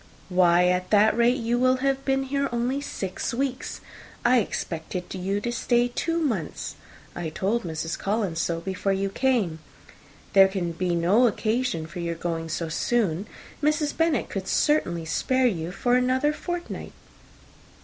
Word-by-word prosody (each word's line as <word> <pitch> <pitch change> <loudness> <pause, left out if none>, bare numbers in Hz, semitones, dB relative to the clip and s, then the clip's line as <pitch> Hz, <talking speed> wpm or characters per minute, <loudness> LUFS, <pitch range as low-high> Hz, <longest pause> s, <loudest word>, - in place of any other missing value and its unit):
"Why, 180 -1 +4
at 180 0 0
that 215 +1 +5
rate, 235 +2 +3
you 240 0 0
will 255 +1 +4
have 270 +1 0
been 270 0 +1
here 280 +1 -1
only 245 +4 -1
six 195 -4 -4
weeks. 265 0 -3 0.4
I 245 +1 +6
expected 180 -3 -4
you 190 +2 -1
to 240 - -2
stay 240 0 +2
two 330 +7 -1
months. 230 - -2 0.4
I 170 -2 -3
told 200 +9 0
Mrs. 165 -1 -4
Collins 195 -5 -1
so 165 -1 -1
before 195 +2 -1
you 195 0 -1
came. 215 -10 +1 0.7
There 195 -1 +8
can 190 -3 -2
be 175 +1 -1
no 195 +9 +4
occasion 220 -6 -1
for 170 +3 -8
your 170 -1 -2
going 165 -1 -3
so 165 +1 -2
soon. 195 +2 0 0.3
Mrs. 300 0 +1
Bennet 325 -6 +1
could 190 -1 -5
certainly 175 - +1
spare 260 +11 +1
you 175 -7 0
for 245 +6 0
another 255 +4 +2
fortnight." 350 +2 -5
210 Hz, 155 wpm, -25 LUFS, 175-255 Hz, 0.7 s, There